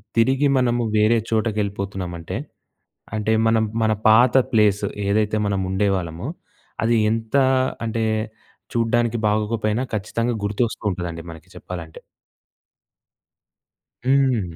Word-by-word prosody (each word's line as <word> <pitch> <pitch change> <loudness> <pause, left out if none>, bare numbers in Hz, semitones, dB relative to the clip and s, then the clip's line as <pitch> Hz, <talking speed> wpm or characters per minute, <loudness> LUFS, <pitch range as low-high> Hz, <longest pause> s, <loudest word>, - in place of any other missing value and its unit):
తిరిగి 130 +5 +3
మనము 120 -1 +1
వేరే 110 +2 +4
చోటకెళ్ళిపోతున్నామంటే 100 -5 -2 0.8
అంటే 110 0 0 0.2
మనం 110 0 +3 0.2
మన 110 -1 +3 0.2
పాత 120 +4 +6 0.2
ప్లేసు 105 -4 +3 0.2
ఏదైతే 105 +1 +1
మనం 100 -1 0
ఉండేవాళ్ళమో, 95 -1 -1 0.6
అది 115 +1 +3 0.2
ఎంత 115 +2 -3 0.5
అంటే 115 0 -1 0.7
చూడ్డానికి 120 0 +1
బాగోకపోయినా 110 +2 0
ఖచ్చితంగా 115 +3 -1
గుర్తొస్తూ 110 +3 -1
ఉంటదండి 85 -2 -5
మనకి 80 -2 -13
చెప్పాలంటే. 85 -3 -8 2.1
హ్మ్. 130 -10 +2
110 Hz, 95 wpm, -22 LUFS, 100-115 Hz, 2.1 s, పాత